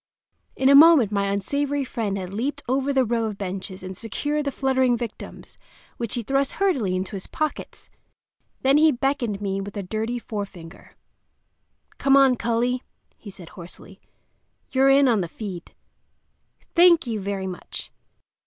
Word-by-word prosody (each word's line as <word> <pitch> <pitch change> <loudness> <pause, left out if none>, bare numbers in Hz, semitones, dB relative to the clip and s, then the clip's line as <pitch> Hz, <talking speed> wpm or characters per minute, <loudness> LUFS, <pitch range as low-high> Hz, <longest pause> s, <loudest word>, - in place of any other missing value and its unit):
In 265 - +1
a 275 - +7
moment 285 -7 +7
my 200 -1 0
unsavory 280 +9 -1
friend 220 -6 -3
had 185 0 -6
leaped 280 +7 -3
over 270 +2 0
the 265 -2 +2
row 230 0 0
of 210 -2 -4
benches 190 -1 -6
and 185 0 -7
secured 290 +9 -3
the 280 - -1
fluttering 260 -2 +1
victims, 230 -2 -9 0.4
which 235 -3 -4
he 240 - -3
thrust 275 +3 0
hurriedly 265 - 0
into 185 +2 -4
his 190 - -7
pockets. 310 -1 -5 0.7
Then 270 +2 +4
he 315 0 +5
beckoned 245 -6 -1
me 195 0 -2
with 200 +1 -7
a 200 - -3
dirty 220 +5 -3
forefinger. 200 -7 -8 1.0
"Come 275 0 +4
on, 270 -2 +5
cully," 240 +2 -1 0.3
he 210 - -12
said 180 -3 -12
hoarsely. 180 +2 -13 0.7
"You're 265 +1 +4
in 275 0 +5
on 225 -5 +2
the 175 - -3
feed." 180 -1 -8 1.0
Thank 340 -2 +6
you 225 -3 -3
very 195 -1 -4
much! 185 -1 -7
235 Hz, 155 wpm, -23 LUFS, 195-275 Hz, 1.0 s, a